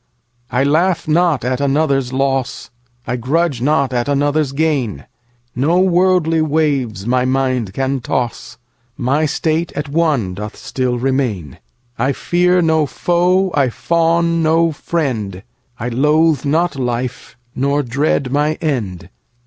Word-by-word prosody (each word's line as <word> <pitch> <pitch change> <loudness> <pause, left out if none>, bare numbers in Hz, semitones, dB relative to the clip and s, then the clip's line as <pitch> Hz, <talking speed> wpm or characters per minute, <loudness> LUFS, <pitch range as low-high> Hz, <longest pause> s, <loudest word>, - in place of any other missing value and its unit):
I 125 +2 +1
laugh 165 +6 +1
not 160 -4 +2
at 130 +2 -1
another's 140 -2 +1
loss,I 125 -2 -3
grudge 140 +2 0
not 140 -1 +1
at 120 +2 -1
another's 145 0 +1
gain; 140 - -1 0.5
No 150 +8 +2
worldly 180 -3 +3
waves 140 -10 0
my 125 +1 +1
mind 130 -5 0
can 135 0 -1
toss; 120 0 -3 0.4
My 140 +5 +1
state 160 +2 -1
at 145 -1 -4
one 145 - +1
doth 105 +3 -7
still 125 -2 -2
remain:I 120 - -3
fear 180 +4 +2
no 160 -2 +2
foe, 180 +5 +1
I 140 -3 +2
fawn 170 +4 +1
no 165 +1 +3
friend;I 110 - -4
loathe 150 +3 +2
not 165 +4 +1
life, 125 -1 -4 0.2
nor 140 +2 0
dread 135 +1 0
my 150 +2 +1
end. 115 - -3
140 Hz, 120 wpm, -17 LUFS, 125-160 Hz, 0.5 s, worldly